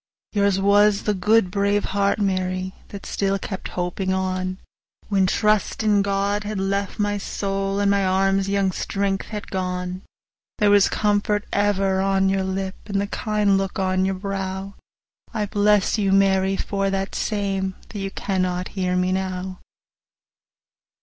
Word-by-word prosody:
Yours 200 Hz, -2 st, +2 dB
was 205 Hz, +1 st, +4 dB
the 210 Hz, -, +1 dB
good, 205 Hz, 0 st, +3 dB
brave 200 Hz, +1 st, +1 dB
heart, 200 Hz, 0 st, +2 dB
Mary, 185 Hz, -2 st, -1 dB
That 200 Hz, -, -9 dB
still 195 Hz, 0 st, 0 dB
kept 190 Hz, 0 st, -5 dB
hoping 180 Hz, +2 st, -1 dB
on, 185 Hz, 0 st, -1 dB, 0.5 s
When 195 Hz, -2 st, +3 dB
the -, -, +1 dB
trust 215 Hz, 0 st, +1 dB
in 210 Hz, -2 st, +4 dB
God 200 Hz, +1 st, 0 dB
had 210 Hz, 0 st, -4 dB
left 195 Hz, 0 st, -1 dB
my 205 Hz, -1 st, 0 dB
soul, 195 Hz, 0 st, -2 dB
35 200 Hz, -, 0 dB
And 200 Hz, -, +3 dB
my 200 Hz, -1 st, +2 dB
arm's 195 Hz, +1 st, +2 dB
young 200 Hz, -1 st, +1 dB
strength 195 Hz, +2 st, -2 dB
was 210 Hz, -1 st, -4 dB
gone: 180 Hz, -1 st, -3 dB, 0.6 s
There 205 Hz, -1 st, +4 dB
was 205 Hz, -1 st, +5 dB
comfort 210 Hz, 0 st, +1 dB
ever 195 Hz, -2 st, +2 dB
on 195 Hz, 0 st, +2 dB
your 195 Hz, 0 st, +1 dB
lip, 190 Hz, 0 st, -3 dB
And 200 Hz, -1 st, -1 dB
the 200 Hz, -, 0 dB
kind 205 Hz, -1 st, +1 dB
look 195 Hz, -1 st, -3 dB
on 185 Hz, 0 st, +1 dB
your 190 Hz, 0 st, 0 dB
brow— 195 Hz, 0 st, -4 dB, 0.6 s
I 215 Hz, -2 st, 0 dB
bless 205 Hz, +1 st, +2 dB
you, 195 Hz, -2 st, +1 dB
Mary, 195 Hz, 0 st, +3 dB
for 195 Hz, -1 st, -1 dB
that 195 Hz, 0 st, -2 dB
same, 195 Hz, -3 st, -1 dB
Though 210 Hz, -, -6 dB
you 195 Hz, 0 st, -3 dB
cannot 185 Hz, -2 st, -2 dB
hear 185 Hz, -2 st, -1 dB
me 180 Hz, 0 st, +1 dB
now. 185 Hz, 0 st, -3 dB
195 Hz, 160 wpm, -23 LUFS, 190-205 Hz, 0.6 s, was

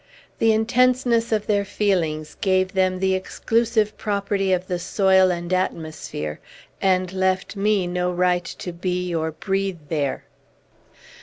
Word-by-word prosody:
The 225 Hz, -, +4 dB
intenseness 235 Hz, +1 st, +2 dB
of 215 Hz, -2 st, +1 dB
their 205 Hz, -1 st, +1 dB
feelings 175 Hz, -7 st, -1 dB
gave 185 Hz, 0 st, +2 dB
them 185 Hz, -1 st, +2 dB
the 190 Hz, 0 st, +1 dB
exclusive 220 Hz, +3 st, 0 dB
property 200 Hz, -1 st, -1 dB
of 180 Hz, 0 st, +1 dB
the 180 Hz, -1 st, -3 dB
soil 190 Hz, +1 st, +3 dB
and 175 Hz, 0 st, -2 dB
atmosphere, 155 Hz, -, -3 dB, 0.4 s
and 185 Hz, -1 st, +1 dB
left 190 Hz, +1 st, 0 dB
me 200 Hz, -1 st, +1 dB
no 180 Hz, 0 st, -1 dB
right 180 Hz, 0 st, +1 dB
to 180 Hz, -, -6 dB
be 180 Hz, 0 st, -2 dB
or 160 Hz, -1 st, -1 dB
breathe 195 Hz, +2 st, -2 dB
there. 145 Hz, -4 st, -1 dB
185 Hz, 135 wpm, -23 LUFS, 180-205 Hz, 0.4 s, The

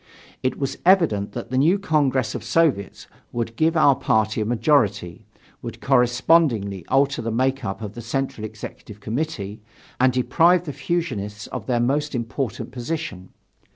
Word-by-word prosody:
It 130 Hz, -, -1 dB
was 135 Hz, -2 st, -3 dB
evident 165 Hz, -, +3 dB
that 120 Hz, 0 st, -6 dB
the 130 Hz, -, +2 dB
new 165 Hz, +8 st, +4 dB
Congress 140 Hz, -, +1 dB
of -, -, -5 dB
Soviets 140 Hz, -13 st, 0 dB, 0.3 s
would 115 Hz, -1 st, -3 dB
give 160 Hz, +3 st, +2 dB
our 145 Hz, -3 st, +6 dB
party 110 Hz, -4 st, +1 dB
a -, -, 0 dB
majority, 110 Hz, -, +1 dB, 0.3 s
would -, -, -7 dB
correspondingly 125 Hz, -, +2 dB
alter 140 Hz, -1 st, +2 dB
the 115 Hz, -, -3 dB
make 130 Hz, +3 st, 0 dB
up 105 Hz, +1 st, -4 dB
of 105 Hz, -1 st, -6 dB
the 120 Hz, -, -8 dB
Central 120 Hz, -1 st, -3 dB
Executive 105 Hz, -1 st, -9 dB
Committee, 110 Hz, -3 st, -4 dB, 0.4 s
and 130 Hz, +1 st, +4 dB
deprive 170 Hz, +8 st, +3 dB
the 145 Hz, -, -5 dB
fusionists 120 Hz, -10 st, -3 dB
of -, -, -6 dB
their 120 Hz, -2 st, +1 dB
most 140 Hz, +4 st, 0 dB
important 120 Hz, 0 st, -3 dB
position. 120 Hz, -, -5 dB
125 Hz, 155 wpm, -23 LUFS, 110-150 Hz, 0.4 s, our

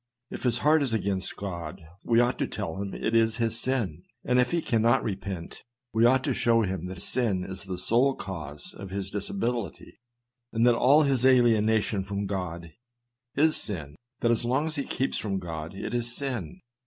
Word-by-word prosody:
If -, -, -6 dB
his 120 Hz, -1 st, +2 dB
heart 155 Hz, +1 st, +5 dB
is 130 Hz, -5 st, 0 dB
against 95 Hz, -3 st, -1 dB
God, 85 Hz, -6 st, -6 dB, 0.2 s
we 115 Hz, -1 st, +3 dB
ought 120 Hz, +1 st, +2 dB
to -, -, 0 dB
tell 80 Hz, +4 st, -4 dB
him 100 Hz, -1 st, -4 dB
it 110 Hz, -, -2 dB
is 115 Hz, -1 st, +3 dB
his 115 Hz, -1 st, 0 dB
sin; 115 Hz, -, -1 dB, 0.2 s
and 125 Hz, 0 st, +3 dB
if 125 Hz, 0 st, +3 dB
he 170 Hz, -, +1 dB
cannot 115 Hz, -5 st, +2 dB
repent, 95 Hz, -4 st, -5 dB, 0.3 s
we 115 Hz, +1 st, +4 dB
ought 130 Hz, +2 st, +4 dB
to 135 Hz, -, 0 dB
show 115 Hz, -1 st, +3 dB
him 95 Hz, -3 st, -3 dB
that 90 Hz, -1 st, -7 dB
sin 110 Hz, -8 st, 0 dB
is 95 Hz, +1 st, -7 dB
the 95 Hz, -2 st, -4 dB
sole 120 Hz, +9 st, +3 dB
cause 75 Hz, -6 st, -7 dB
of 100 Hz, 0 st, -8 dB
his 95 Hz, 0 st, -4 dB
disability 120 Hz, -, -3 dB, 0.3 s
— 120 Hz, 0 st, -57 dB
that 120 Hz, +1 st, +4 dB
all 140 Hz, +6 st, +5 dB
his 135 Hz, -4 st, +2 dB
alienation 110 Hz, -5 st, +4 dB
from 100 Hz, +1 st, -3 dB
God 90 Hz, -4 st, -4 dB, 0.6 s
is 155 Hz, +2 st, +4 dB
sin 75 Hz, -8 st, -4 dB
— 125 Hz, -1 st, -58 dB
that 120 Hz, -, +3 dB
as 120 Hz, -, +1 dB
long 130 Hz, +5 st, +1 dB
as 160 Hz, -1 st, -3 dB
he 140 Hz, -, -2 dB
keeps 135 Hz, -, -1 dB
from 100 Hz, -3 st, -2 dB
God 80 Hz, -1 st, -6 dB
it 105 Hz, -, -5 dB
is 120 Hz, -1 st, 0 dB
sin. 125 Hz, -, -4 dB
115 Hz, 195 wpm, -27 LUFS, 95-125 Hz, 0.6 s, heart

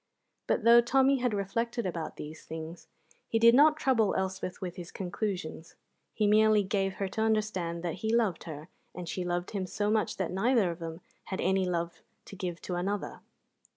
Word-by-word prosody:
But -, -, +1 dB
though 235 Hz, +1 st, +8 dB
Tommy 270 Hz, +3 st, +3 dB
had 245 Hz, -1 st, +1 dB
reflected 230 Hz, +3 st, -2 dB
about 170 Hz, -3 st, -4 dB
these 155 Hz, +1 st, -9 dB
things, 160 Hz, +2 st, -8 dB, 0.4 s
he 225 Hz, -, +1 dB
did 230 Hz, +1 st, +7 dB
not 300 Hz, +4 st, +6 dB
trouble 230 Hz, -8 st, +2 dB
Elspeth 190 Hz, -1 st, -3 dB
with 180 Hz, -2 st, -5 dB
his 175 Hz, -2 st, -8 dB
conclusions. 180 Hz, -4 st, -4 dB, 0.4 s
He 215 Hz, -, +2 dB
merely 215 Hz, 0 st, +5 dB
gave 195 Hz, -1 st, -1 dB
her 195 Hz, -, -2 dB
to 220 Hz, -, -3 dB
understand 210 Hz, -6 st, 0 dB
that 170 Hz, -2 st, -1 dB
he 220 Hz, -, 0 dB
loved 225 Hz, -7 st, +1 dB
her 155 Hz, 0 st, -8 dB, 0.3 s
and 180 Hz, -1 st, -6 dB
she 185 Hz, -, -3 dB
loved 175 Hz, 0 st, -2 dB
him 195 Hz, -3 st, -3 dB
so 205 Hz, +3 st, -1 dB
much 220 Hz, -1 st, 0 dB
that -, -, -2 dB
neither 200 Hz, 0 st, +2 dB
of 170 Hz, -, -8 dB
them 165 Hz, +1 st, -6 dB, 0.2 s
had 190 Hz, -, -4 dB
any 190 Hz, +1 st, +2 dB
love 170 Hz, -1 st, -3 dB, 0.2 s
to -, -, -10 dB
give 180 Hz, -3 st, -4 dB
to 180 Hz, -, -4 dB
another. 195 Hz, +3 st, -2 dB
195 Hz, 190 wpm, -30 LUFS, 175-220 Hz, 0.4 s, though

